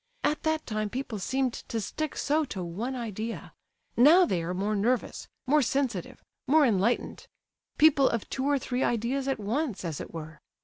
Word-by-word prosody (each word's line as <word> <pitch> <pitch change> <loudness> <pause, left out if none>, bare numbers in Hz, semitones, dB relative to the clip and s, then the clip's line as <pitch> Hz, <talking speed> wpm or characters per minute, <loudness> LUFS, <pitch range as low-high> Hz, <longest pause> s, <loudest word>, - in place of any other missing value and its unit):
At 305 - +1
that 315 0 -1
time 215 -2 -2
people 245 -2 -4
seemed 260 +5 0
to 230 - -5
stick 305 +9 -4
so 305 +2 +1
to 190 -8 -5
one 210 +10 -4
idea; 225 -1 -5 0.4
now, 315 +9 +7
they 180 - -1
are 175 +2 -3
more 205 +3 -1
nervous, 235 +5 -1 0.2
more 295 +3 +4
sensitive, 250 -8 -2 0.2
more 300 +2 +5
enlightened—people 260 +6 +1
of 230 -3 -2
two 265 - -3
or 285 - +3
three 255 0 -2
ideas 245 +4 0
at 270 -4 -1
once—as 210 - -2
it - - -8
were. 155 -2 -8
240 Hz, 165 wpm, -28 LUFS, 205-275 Hz, 0.4 s, now